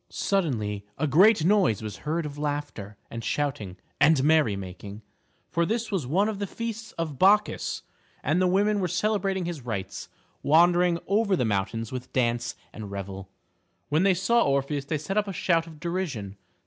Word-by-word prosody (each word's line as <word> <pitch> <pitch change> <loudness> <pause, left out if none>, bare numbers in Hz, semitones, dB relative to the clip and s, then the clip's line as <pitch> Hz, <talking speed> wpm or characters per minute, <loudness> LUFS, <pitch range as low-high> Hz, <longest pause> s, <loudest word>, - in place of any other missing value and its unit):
Suddenly 115 - -1
a 155 - 0
great 175 +5 +5
noise 185 - +3
was 105 -2 -6
heard 160 +2 -2
of 145 -1 -6
laughter 145 -9 -4
and 115 0 -6
shouting 110 -12 -2 0.2
and 150 -2 +5
merry 150 -8 +4
making. 100 +2 -8 0.5
For 170 - +1
this 225 +6 -1
was 180 -11 -1
one 190 +9 +2
of 215 -2 -3
the 200 - -2
feasts 225 +1 -5
of 155 -5 -4
Bacchus, 210 +2 +3 0.4
and 155 +6 +1
the 185 - +4
women 205 +3 +2
were 185 - 0
celebrating 195 -1 0
his 170 -4 -4
rites, 100 -5 -5 0.3
wandering 175 +3 +4
over 200 0 +2
the 125 - 0
mountains 110 +2 -2
with 125 -1 -6
dance 120 -2 0 0.2
and 105 -2 -7
revel. 95 -1 -6 0.6
When 155 +2 +2
they 190 -1 +4
saw 235 +6 +3
Orpheus 140 0 0
they 155 +2 -1
set 195 +8 -1
up 210 - -2
a 195 - -4
shout 170 -2 +1
of 160 -2 -12
derision. 160 - -3
155 Hz, 175 wpm, -26 LUFS, 115-190 Hz, 0.6 s, great